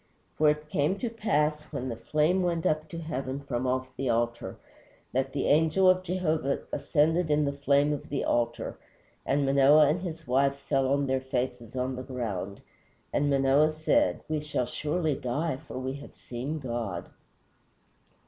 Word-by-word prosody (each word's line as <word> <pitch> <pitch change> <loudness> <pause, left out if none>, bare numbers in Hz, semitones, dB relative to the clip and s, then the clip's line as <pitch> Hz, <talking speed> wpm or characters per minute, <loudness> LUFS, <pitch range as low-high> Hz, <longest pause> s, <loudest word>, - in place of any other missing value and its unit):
For 155 -1 +4
it 150 0 -1
came 150 +7 +1
to 235 +2 -3
pass, 150 -9 +1
when 130 -3 -3
the 115 - -3
flame 155 +10 +1
went 170 -2 -1
up 155 0 0
to 170 - -7
heaven 140 -5 -4
from 130 -2 -2
off 130 0 -2
the 135 -1 -2
altar, 120 0 -1 0.6
that 135 +1 0
the 140 -1 -2
angel 160 +5 +4
of 185 0 +5
Jehovah 160 -6 -1
ascended 160 +2 +2
in 150 0 +3
the 140 - 0
flame 140 +1 +2
on 145 - -3
the 140 - -1
altar, 120 0 -1 0.5
and 140 +1 +2
Manoah 140 +2 +6
and 165 +4 0
his 165 -3 -6
wife 135 +2 +2
fell 135 -1 0
on 140 0 +2
their 130 -1 0
faces 125 -3 -3
on 130 +1 -1
the - - -4
ground. 110 -7 -4 0.5
And 145 0 +2
Manoah 140 +2 +4
said, 225 - +1
We 155 -1 -1
shall 150 -4 -2
surely 155 +4 -1
die, 135 +4 -2
for - - -6
we 130 +1 -3
have 140 - -12
seen 130 +6 -5
God." 115 - -4
140 Hz, 170 wpm, -28 LUFS, 130-155 Hz, 0.6 s, Manoah